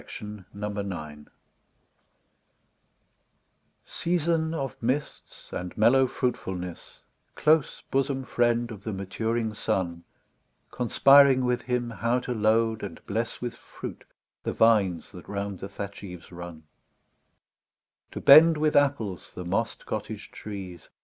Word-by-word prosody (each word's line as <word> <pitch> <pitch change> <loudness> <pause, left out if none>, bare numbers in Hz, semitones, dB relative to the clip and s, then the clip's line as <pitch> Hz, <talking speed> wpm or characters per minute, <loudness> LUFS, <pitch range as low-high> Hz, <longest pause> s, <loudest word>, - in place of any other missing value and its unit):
TO 105 -2 -9
AUTUMN 95 -8 -5 2.6
SEASON 165 -1 0
of 135 -4 -3
mists 130 +6 -4
and 90 0 -5
mellow 130 +5 +5
fruitfulness, 95 -9 -4 0.3
Close 155 -1 +2
bosom 135 0 0
friend 120 -1 +1
of 100 -3 -9
the 110 - -4
maturing 110 +4 -2
sun; 85 -5 -2 0.7
Conspiring 135 +2 +5
with 125 0 +1
him 125 -1 -2
how 115 +2 0
to 125 0 -4
load 110 0 +2
and 95 -5 -8
bless 115 +3 -3
With 120 -1 -3
fruit - - -9 0.4
the - - -3
vines 105 -7 +3
that 90 -3 -12
round 100 -2 -4
the 95 - -6
thatch 100 0 -7
eves 90 -3 -10
run; 85 -2 -9 1.5
To - - -4
bend 160 +3 +8
with 155 0 +1
apples 135 -10 +1
the 90 - -6
moss'd 90 +3 -2
cottage - - -5
trees. 95 -5 -8
110 Hz, 115 wpm, -27 LUFS, 95-130 Hz, 2.6 s, bend